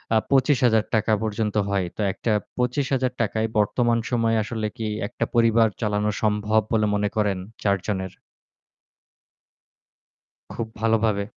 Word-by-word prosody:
আ - - +6
৳২৫০০০ 120 -5 +3
পর্যন্ত 110 -1 -2
হয়। 100 -2 0
তো - - -2
একটা 110 +3 -2 0.3
৳২৫০০০ 125 -3 -1
য় - - -3
বর্তমান 115 +2 +2
সময়ে 115 -2 +2
আসলে 110 0 -3
কি 115 - -3 0.2
একটা - - -3
পরিবার 115 -1 +4
চালানো 105 -1 0
সম্ভব 105 0 +2
বলে 110 -2 +2
মনে 105 0 0
করেন 105 -3 +1 0.3
৪ 100 -1 +3
জনের? 95 -3 -2 2.4
খুব 115 - -4
ভালোভাবে। 110 -2 +2
110 Hz, 120 wpm, -24 LUFS, 105-115 Hz, 2.4 s, আ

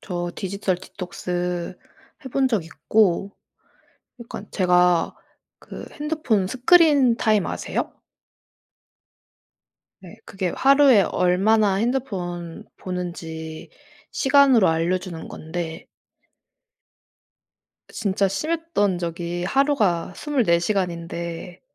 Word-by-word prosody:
저 175 -3 -4
디지털 195 -1 -2
디톡스 180 -1 -5 0.5
해 - - -6
본 265 +1 +1
적 210 -9 0
있고. 195 +2 0 0.8
약간 215 -3 -8
제가 180 -2 +2 0.4
그 - - -10
핸드폰 295 -10 -1
스크린 265 - +4
타임 215 -4 +2
아세요? - - -4 2.0
네. 185 +4 -12
그게 190 -2 -3
하루에 275 -6 +6
얼마나 195 +4 +2
핸드폰 190 -8 -3
보는지 165 -3 -6 0.4
시간으로 270 - +4
알려 165 +3 +1
주는 180 -3 -8
건데 160 0 -6 2.0
진짜 200 -2 0
심했던 205 - -1
적이 175 0 -4
하루가 210 - +1
24 245 - +1
시간인데 170 -1 -3
190 Hz, 185 characters per minute, -23 LUFS, 175-235 Hz, 2.0 s, 하루에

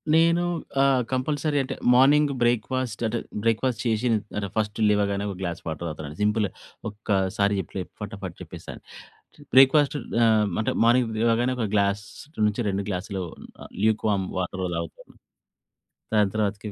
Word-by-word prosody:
నేను 170 +1 +4 0.4
ఆహ్, 135 -2 +4
కంపల్సరీ 145 +3 0
అంటే 130 - -5 0.2
మార్నింగు 140 +3 +5
బ్రేక్‌ఫాస్ట్ 120 0 0
అంటే, 115 +1 -2 0.2
బ్రేక్‌ఫాస్ట్ 115 +2 +1
చేసి 115 +1 +1
న్ 110 - +3 0.2
అంటే 100 -1 -2
ఫస్ట్ 105 -1 -1
లేవగానే 100 -1 +1
ఒక 100 - -5
గ్లాస్ 85 -3 -3
వాటర్ 80 +2 -4
తాగుతానండి. 75 -1 -7
సింపుల్‌గా 105 -1 +1 0.4
ఒక్కసారి 100 -1 0
చెప్పలే 95 +1 -4 0.2
ఫటాఫట్ 100 -4 -6
చెప్పేస్తాను. - - -9 0.7
బ్రేక్‌ఫాస్ట్ 140 +2 +6 0.3
ఆహ్, 110 -2 +4
అంటే 110 - 0
మార్నింగ్ 120 -1 +3
లేవగానే 120 +2 +2
ఒక 115 - 0
గ్లాస్ 100 0 +1 0.4
నుంచి 105 +3 -1
2 100 0 -2
గ్లాస్‌లు 95 0 -3 0.6
లూక్ 110 0 +1
వార్మ్ 95 -2 0
వాటర్ 95 +1 -3
తాగుతాను. 85 -1 -8 1.0
దాని 105 -2 +3
తర్వాతకి 105 0 -1
105 Hz, 135 wpm, -25 LUFS, 100-125 Hz, 1.0 s, బ్రేక్‌ఫాస్ట్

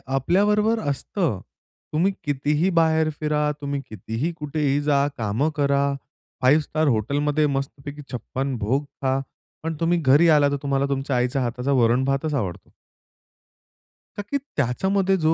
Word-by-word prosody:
आपल्याबरोबर 210 - +2
असतं. 145 - -2 0.5
तुम्ही 175 +6 +2
कितीही 150 +4 +1
बाहेर 160 -1 +3
फिरा, 150 -1 +1
तुम्ही 140 -1 -3
कितीही, 115 +8 -3
कुठेही 145 -1 0
जा, 145 -1 +2
कामं 115 +7 0
करा, 140 -1 +2 0.6
5 140 +5 +5
स्टार 155 +1 -1
हॉटेलमध्ये 145 +6 +1
मस्तपैकी 140 +1 -4
56 130 +2 -3
भोग 130 +7 0
खा. 135 -1 -2 0.4
पण 160 0 -2
तुम्ही 170 +1 +2
घरी 150 +4 +5
आला 145 -2 +5
तर 140 - -1
तुम्हाला 140 -1 +1
तुमच्या 135 -1 -1
आईच्या 125 +2 0
हाताचा 125 +3 -2
वरण 120 0 +3
भातच 135 +3 0
आवडतो. 100 -11 -3 1.5
का - - -2
की 285 - +2 0.2
त्याच्यामध्ये 190 +9 +1
जो 160 -2 +2
145 Hz, 135 wpm, -23 LUFS, 135-155 Hz, 1.5 s, 5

